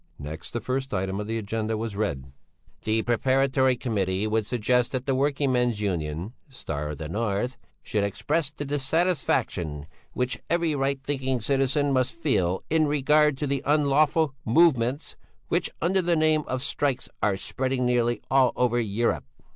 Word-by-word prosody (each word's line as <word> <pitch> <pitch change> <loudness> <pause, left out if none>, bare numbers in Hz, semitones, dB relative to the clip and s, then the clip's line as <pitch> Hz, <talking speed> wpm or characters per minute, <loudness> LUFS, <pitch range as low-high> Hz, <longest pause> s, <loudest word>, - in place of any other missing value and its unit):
Next 75 +3 -7
the 120 - -3
first 130 +1 -2
item 95 +1 -2
of 105 - -4
the 115 +1 -2
agenda 110 +1 -2
was 110 -2 -4
read: 70 -11 -3 0.5
"The 110 +1 0
Preparatory 130 +2 +2
Committee 100 -5 -1
would 110 0 0
suggest 125 +1 +1
that 130 0 -2
the 135 - +1
working 140 +1 +1
men's 125 -3 +1
union 85 0 -2 0.2
'Star 75 - -5
of 75 - -5
the 80 +1 -5
North' 105 +6 -1 0.3
should 105 -2 -1
express 145 - -1
the 145 0 -6
dissatisfaction 135 - 0 0.3
which 125 +1 -2
every 170 -2 +1
right 135 -1 0
thinking 130 -2 -1
citizen 135 +3 +1
must 130 -1 +1
feel 95 - 0
in 160 -1 +2
regard 150 0 +3
to 145 - -2
the 140 -1 -1
unlawful 150 +1 +3
movements 130 0 +2 0.3
which - - +1
under 190 +3 +2
the 175 -1 +1
name 155 -1 +2
of 130 0 -2
strikes 140 -3 -1
are 100 -2 +2
spreading 130 +4 -1
nearly 120 -1 +1
all 130 -2 +4
over 120 -1 +2
Europe." 105 - 0
125 Hz, 160 wpm, -26 LUFS, 105-140 Hz, 0.5 s, all